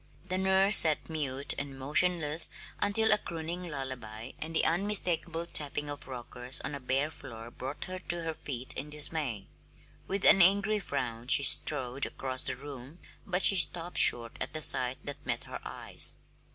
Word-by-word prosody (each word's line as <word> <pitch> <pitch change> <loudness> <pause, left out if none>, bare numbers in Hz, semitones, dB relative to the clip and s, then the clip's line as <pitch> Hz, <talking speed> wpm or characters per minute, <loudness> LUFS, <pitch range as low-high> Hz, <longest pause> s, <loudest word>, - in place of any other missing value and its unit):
The 185 +1 -2
nurse 190 +1 +3
sat 160 0 +3
mute 140 -3 0
and 140 -1 -7
motionless 155 +3 +2 0.3
until 220 +2 +1
a - - +4
crooning 170 0 -7
lullaby 130 -5 -8
and 160 +1 -7
the - - +1
unmistakable 175 -2 -1
tapping 150 -2 -2
of 145 - -10
rockers 125 0 +1
on - - -7
a 140 - -6
bare 135 +4 -2
floor 115 -5 -12
brought 135 +4 -8
her 185 0 -7
to 175 -1 -5
her 165 0 -5
feet 130 -4 -6
in 150 - -7
dismay. 150 -8 -1 0.6
With 195 0 -4
an 195 - +6
angry 200 +4 +2
frown 125 - -6
she 140 +1 +6
strode 135 0 +3
across 130 -1 -5
the - - -5
room, 140 +2 -12 0.3
but 185 -1 -2
she 195 - +8
stopped 175 -1 +3
short 115 -1 +7
at - - -5
the 155 - -3
sight 125 -1 +2
that 145 -1 -8
met - - -4
her - - -9
eyes. - - -3
150 Hz, 170 wpm, -28 LUFS, 130-175 Hz, 0.6 s, she